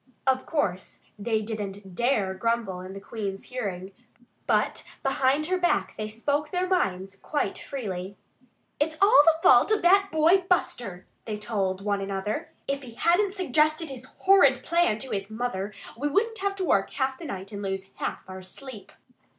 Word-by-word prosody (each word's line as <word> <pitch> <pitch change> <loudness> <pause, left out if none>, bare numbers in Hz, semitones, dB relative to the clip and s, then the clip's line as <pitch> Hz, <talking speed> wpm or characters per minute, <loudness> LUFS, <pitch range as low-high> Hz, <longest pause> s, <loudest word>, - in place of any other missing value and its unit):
Of 260 -1 +1
course 195 - -2 0.2
they 220 0 0
didn't 205 -3 -6
dare 215 -3 +1
grumble 225 -2 -1
in 185 +1 -8
the 195 - -7
Queen's 195 -1 -5
hearing. 200 -7 -5 0.6
But - - +1 0.2
behind 270 +2 +2
her 365 +2 0
back 350 - +1
they 215 - -4
spoke 285 +7 -1
their 365 +2 -1
minds 195 - 0
quite 295 +9 -2
freely. 200 -8 -5 0.6
"It's 315 +2 0
all 395 -7 +8
the 325 -1 +5
fault 245 - +6
of 430 - +2
that 390 +3 +5
boy 320 +4 +5
Buster," 215 - -1 0.2
they 215 -2 -3
told 195 -3 -2
one 200 -1 0
another. 195 +2 -3 0.2
"If 275 0 -1
he 240 -4 -11
hadn't 370 - +2
suggested 310 -4 +1
his 255 -1 -8
horrid 280 -10 +5
plan 340 -10 +2
to 260 +2 -5
his 195 -1 -2
mother 220 -3 -3 0.2
we 280 +6 -1
wouldn't 445 +9 +1
have 395 0 -1
to 380 -2 -2
work 195 - +2
half 265 -1 -1
the 340 - -8
night 195 -5 -6
and 200 -1 -6
lose 195 -1 -4
half - - -3
our 190 0 -8
sleep." 215 +4 -9
240 Hz, 170 wpm, -27 LUFS, 195-310 Hz, 0.6 s, all